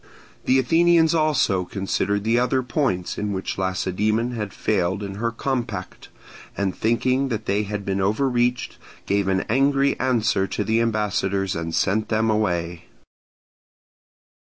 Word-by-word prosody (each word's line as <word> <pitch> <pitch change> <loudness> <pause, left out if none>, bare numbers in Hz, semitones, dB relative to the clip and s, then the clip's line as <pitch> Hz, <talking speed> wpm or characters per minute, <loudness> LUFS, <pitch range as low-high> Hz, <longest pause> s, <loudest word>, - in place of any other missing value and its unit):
The 130 - +4
Athenians 165 +4 +4
also 150 - +2
considered 100 +2 -2
the 115 +2 +2
other 130 +1 +1
points 120 - -1
in 105 -1 -2
which 95 0 -4
Lacedaemon 100 +5 0
had 105 -4 -4
failed 95 0 -1
in 100 -1 -6
her 115 - +1
compact, 115 -6 -4 0.5
and 95 -2 -1
thinking 130 +4 +1
that 110 -2 -3
they 100 0 +1
had 105 -1 -5
been 95 0 -1
overreached, 120 +4 0 0.3
gave 100 -1 0
an 95 0 +1
angry 140 +3 +1
answer 115 -6 +1
to - - -2
the 110 +1 +1
ambassadors 100 -4 0
and 80 0 -3
sent 105 +3 0
them 110 0 +1
away. 85 -5 -1
105 Hz, 135 wpm, -23 LUFS, 95-125 Hz, 0.5 s, The